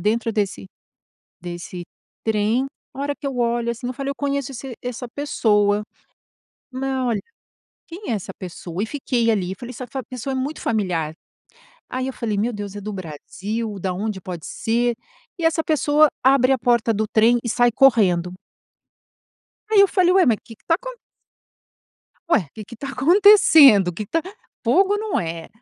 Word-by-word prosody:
dentro 225 +4 0
desse 195 - -2 0.7
desse 175 0 -7 0.4
trem, 220 +3 +1 0.3
a 270 - -7
hora 285 +1 -1
que 285 - -8
eu 270 -2 -3
olho 235 0 0
assim 235 +1 -5
eu 250 - -2
falei: 275 +2 -4
"Eu - - -3
conheço 280 -2 -2
esse 255 0 -7
essa 250 0 -5
pessoa. 210 -7 +1 0.9
Não, 260 -1 -2
olha 230 -3 0 0.7
quem 345 - -8
é - - +1
essa 200 - -5
pessoa?". 180 0 -6
E - - -1
fiquei 245 -4 0
ali, 190 -3 -1
falei 245 0 -8
"Essa 250 +1 -7
fa 265 +2 -5
pessoa 255 +2 -5
é - - -2
muito 280 +4 -3
familiar!". 175 -8 -1 0.7
Aí 255 +1 -3
eu 265 - -3
falei: 220 -5 -3
"Meu 230 +4 0
Deus, 205 -2 -6
é 205 - -5
do 210 +1 -5
Brasil? 200 +5 -5
Da 185 0 -2
onde 200 +1 -3
pode 175 -4 -7
ser?". 235 +1 0 0.4
E 330 - -3
essa 325 0 +2
pessoa 305 -1 +3 0.2
abre 265 -1 +5
a 265 - +2
porta 235 -1 +2
do 215 +1 0
trem 230 +3 +3
e - - -2
sai 240 +1 +3
correndo 195 -10 +3 1.4
aí 415 -2 +6
eu 395 - +6
falei: 365 -2 +3
"Ué 380 -1 +5
mas 230 -4 +3
que 225 - -13
que - - -36
tá 330 - +3
acon". - - -5 1.4
"ué, 190 - +2
que 215 - -8
que 235 - -12
tá 275 +4 -6
acontecendo? 300 - +6
O 180 - -2
que 210 +5 -5
que - - -22
tá 330 - +1 0.4
fogo 380 - +3
não 435 -1 -1
é. 165 -1 -5
235 Hz, 180 wpm, -22 LUFS, 205-275 Hz, 1.4 s, aí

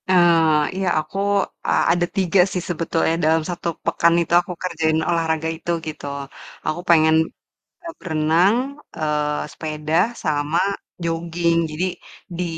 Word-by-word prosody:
Eee, 165 -4 +4
iya 190 - 0
aku, 155 +5 -6 0.5
e - - +1 0.2
ada 175 0 +1
3 190 0 +2
sih - - -2
sebetulnya 165 -1 0
dalam 160 0 +3
1 175 -1 -4 0.2
pekan 170 0 +3
itu 170 - -3
aku 180 +1 -7
kerjain 160 -3 0
olahraga 160 -2 0
itu, 170 - -4 0.2
gitu. 155 -1 -6 0.6
Aku 165 +3 -1
pengen, 160 -1 +5 0.7
e - - -5
berenang, 165 +4 +2 0.4
eee, 150 -1 -1
sepeda, 155 0 -4 0.3
sama 150 0 0 0.4
joging. 170 0 0
Jadi, 160 +4 -1 0.5
di, 180 - -1
165 Hz, 130 wpm, -21 LUFS, 155-175 Hz, 0.7 s, pengen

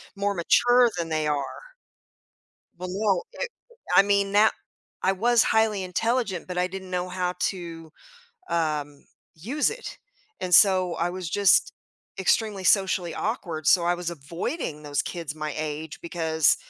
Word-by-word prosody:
more 200 0 0
mature 245 +7 +4
than 170 -1 -3
they 155 -1 0
are." 145 -2 -3 1.2
Well, 180 +1 -6
no, 210 - +1
it - - -4 0.5
I - - +9
mean 200 0 +1
that 210 +2 +5 0.5
I 190 - +3
was 230 +4 +3
highly 220 -3 +2
intelligent, 205 0 -1
but 180 -1 -5
I 180 0 +2
didn't 190 0 -8
know 180 0 -1
how 180 0 -2
to, 165 -4 -4 0.6
um, 150 -3 -2 0.3
use 245 - -1
it 480 +2 -8 0.4
and 180 -1 +1
so 185 -2 +5
I 170 - 0
was 180 -2 -6
just 200 0 +4 0.5
extremely 195 +1 +1
socially 185 -4 +2
awkward, 170 - -3
so 175 0 +5
I 175 +1 +2
was 175 -1 -4
avoiding 165 - -5
those 145 -1 -1
kids 165 -4 -5
my 155 -1 -4
age 155 0 -5
because 160 -3 +2
180 Hz, 145 wpm, -25 LUFS, 160-200 Hz, 1.2 s, I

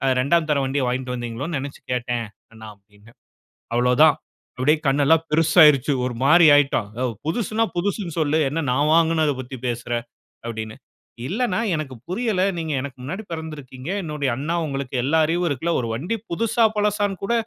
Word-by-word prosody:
2ஆம் 155 +5 +2
தரம் 140 -2 +1
வண்டிய 135 0 -1
வாங்கிட்டு 125 0 -2
வந்தீங்களோன்னு 125 +6 -4
நினைச்சு 140 +1 -8
கேட்டேன், 120 -1 -2 0.3
அண்ணா." 110 -1 -11
அப்பிடீன்னேன். 105 +3 -22 0.6
அவ்வளவு 125 +2 +2
தான் 155 -3 +6 0.4
அப்படியே 150 +5 +2
கண் 140 +1 +2
எல்லாம் 160 +2 +4
பெரிசா 160 +2 +3
ஆகிருச்சு. 145 -1 +4
ஒரு 125 - -3
மாரி 165 +3 +6
ஆகிட்டான். 135 -7 +2
யோவ்! 125 -3 -1
புதுசுன்னா, 220 +4 0
புதுசுன்னு 185 -2 -2
சொல்லு, 155 0 +1
என்ன 160 +2 -2
நான் 145 +4 +2
வாங்கினத 160 -3 +3
பத்தி 130 +1 -7
பேசுற." 120 0 -4 0.5
அப்பிடீன்னு. 110 -1 -5 0.5
"இல்லண்ணா, 220 0 -1 0.2
எனக்கு 140 -4 -5
புரியல. 210 -1 0 0.2
நீங்க 160 -2 -3
எனக்கு 135 -2 -7
முன்னாடி 190 +11 -5
பிறந்துருக்கீங்க. 150 -3 -7
என்னுடைய 150 -4 -2
அண்ணா. 160 +5 -2
உங்களுக்கு 135 -2 -4
எல்லா 160 +4 +2
அறிவும் 175 +1 0
இருக்குல்ல. 160 +5 -1
ஒரு 115 - -4
வண்டி 180 - -3
புதுசா, 230 +4 +2
பழசான்னு 205 -2 0
கூட 235 - 0
150 Hz, 160 wpm, -22 LUFS, 130-170 Hz, 0.6 s, தான்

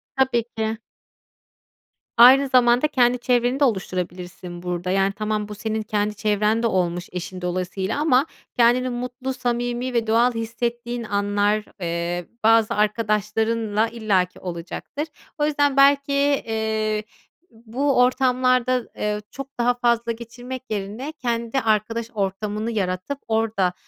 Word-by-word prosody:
Tabii 260 -3 +2
ki. 220 0 -1 1.4
Aynı 265 +4 +8
zamanda 250 +2 +4
kendi 250 -3 +3
çevreni 245 +2 +1
de - - +3
oluşturabilirsin 180 -4 -4
burada. 180 0 -2
Yani, 195 +1 +2
tamam 215 0 -2
bu 210 - -7
senin 220 +1 -2
kendi 210 0 -1
çevren 210 +2 +1
de - - +4
olmuş 175 -3 -1
eşin 180 +1 -6
dolayısıyla 185 +6 -2
ama 285 -3 +3 0.3
kendini 245 +2 +4
mutlu, 250 +2 -4
samimi 245 0 -2
ve 230 -2 0
doğal 235 +2 +3
hissettiğin 235 +1 -3
anlar, 205 0 +1 0.2
eee, 170 0 -2 0.2
bazı 225 0 +4
arkadaşlarınla 215 +1 0
illaki 200 -6 0
olacaktır. 180 - -5 0.3
O 295 - +1
yüzden, 290 -2 +1
belki, 280 0 +4
ııı, 220 -1 0 0.5
bu 240 +5 -1
ortamlarda, 255 -1 +3 0.2
ııı, 210 0 -1
çok 275 0 -9
daha 245 +1 +3
fazla 235 -1 +1
geçirmek 245 +2 -7
yerine 215 +7 -4
kendi 235 -3 -2
arkadaş 225 +1 0
ortamını 210 +2 -2
yaratıp 185 +5 -2
orada, 220 -5 +1
225 Hz, 125 wpm, -23 LUFS, 205-250 Hz, 1.4 s, Aynı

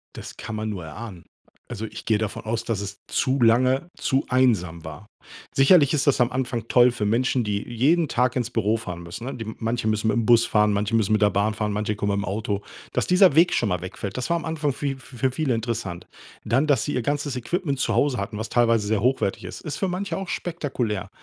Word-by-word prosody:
Das - - -9
kann 110 -1 -6
man 110 0 -3
nur 95 -5 -5
erahnen. 90 +3 -9 0.4
Also, 110 -3 -5
ich - - -9
gehe 110 -2 +2
davon 105 -2 -3
aus, 110 +1 -2
dass 110 -4 -2
es 100 0 -6
zu 135 0 0
lange 130 +7 +3
zu 135 0 0
einsam 105 -11 +1
war. 80 +7 -9 0.5
Sicherlich 140 +1 +5
ist 145 -2 +1
das 135 - +3
am 125 0 +3
Anfang 125 -3 -2
toll 125 +1 +5
für 115 -3 -3
Menschen, 120 +3 +1
die 105 -1 -1
jeden 145 +8 +1
Tag 125 -1 +1
ins 125 -2 -1
Büro 110 -2 +1
fahren 90 -6 -7
müssen, 100 +8 -7
ne? 135 - -4
Die 115 - -6
manche 115 0 -2
müssen 110 0 +1
mit 110 - +1
dem 115 -2 0
Bus 115 0 +6
fahren, 105 -1 +2
manche 105 +2 0
müssen 110 -1 +1
mit 110 - +2
der 105 - +5
Bahn 100 +3 +1
fahren, 105 0 -2
manche 105 +1 -1
kommen 100 0 -1
mit'm - - -5
Auto. 100 0 -2 0.3
Dass - - 0
dieser 180 -4 +5
Weg 170 +2 +5
schon 115 - +1
mal 90 -2 -1
wegfällt, 95 +2 -6
das 125 +6 -4
war 170 - +3
am 165 - -5
Anfang 155 -3 -1
für 140 +2 -3
f 135 -1 -6
für 130 0 -2
viele 135 -2 0
interessant. 115 -6 -4 0.4
Dann, 130 +6 +2
dass 140 -6 +3
sie 145 - -3
ihr 125 - 0
ganzes 145 0 -2
Equipment 140 +3 -2
zu - - 0
Hause 140 -3 +2
hatten, 100 +2 -4
was 110 +1 -4
teilweise 115 -3 +2
sehr 110 -1 +1
hochwertig 125 -4 0
ist, - - -7
ist 150 -3 -5
für 195 - -1
manche 185 +2 -3
auch 195 -1 -5
spektakulär. 130 - -3
115 Hz, 240 wpm, -24 LUFS, 105-135 Hz, 0.5 s, Bus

